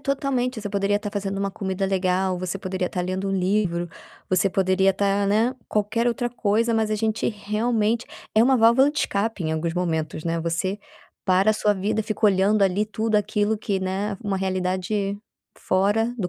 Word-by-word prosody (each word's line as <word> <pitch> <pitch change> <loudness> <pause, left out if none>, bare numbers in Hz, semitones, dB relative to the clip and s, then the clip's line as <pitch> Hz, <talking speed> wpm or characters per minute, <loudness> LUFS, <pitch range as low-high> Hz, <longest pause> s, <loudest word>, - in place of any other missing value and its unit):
totalmente, 270 -4 -1
você 205 - -4
poderia 200 0 +1
estar 205 0 -4
fazendo 195 -1 -3
uma 200 0 -1
comida 190 0 -2
legal, 185 -1 0
você 185 +1 -3
poderia 185 -1 -2
estar 180 - -3
lendo 190 +2 -2
livro, 185 -2 0 0.4
você 185 +1 +2
poderia 190 +1 +3
estar, 200 +1 +1
né, 225 +5 +2
qualquer 220 +3 0
outra 240 +1 -1
coisa, 230 0 +1
mas 220 -1 +1
a 215 - +1
gente 220 +1 0
realmente 220 +2 0 0.3
é 220 - +6
uma 260 +1 +4
válvula 240 +5 +5
de 300 - -4
escape, 205 - -1
em 155 - 0
alguns 165 +1 -1
momentos, 160 -3 -2
né, 165 0 -1
você 170 +4 -2 0.5
para 190 +3 +4
a - - +3
sua 210 0 +2
vida, 205 +3 -1
fica 215 +1 0
olhando 200 +1 +3
ali 195 +2 +2
tudo 220 +1 -2
aquilo 210 +1 +1
que, 205 -2 -2
né, 195 +2 -2
uma 195 -1 0
realidade 190 +2 -1 0.4
fora 205 +5 +1
do 180 - -1
200 Hz, 180 wpm, -24 LUFS, 185-220 Hz, 0.5 s, é